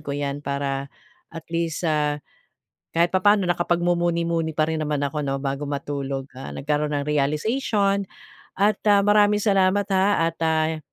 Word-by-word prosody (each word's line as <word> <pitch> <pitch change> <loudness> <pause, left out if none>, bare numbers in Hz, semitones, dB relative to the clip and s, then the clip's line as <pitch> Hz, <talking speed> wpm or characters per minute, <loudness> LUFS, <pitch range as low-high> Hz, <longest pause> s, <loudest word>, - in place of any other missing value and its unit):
ko 140 -2 -5
yan 140 0 -3
para 140 -1 -3 0.4
at 165 -1 -9
least, 165 0 -2
ah, 150 -2 +1 0.8
kahit 170 +1 +3
papaano 200 0 +4
nakapagmumuni-muni 170 -1 0
pa 155 0 0
rin 160 -1 -1
naman 150 -1 -1
ako 145 +1 -2
'no 135 0 -2
bago 140 +1 -3
matulog, 140 -1 -4
ah, 130 - -7
nagkaroon 150 +1 -1
ng 145 0 -2
realization 200 - +1 0.5
at, 205 +2 +2
ah, 205 -1 +5
maraming 205 0 +4
salamat, 195 -1 +2
ha 190 -3 +2
at, 165 - -23
ah, 160 0 +1
160 Hz, 150 wpm, -23 LUFS, 145-185 Hz, 0.8 s, ah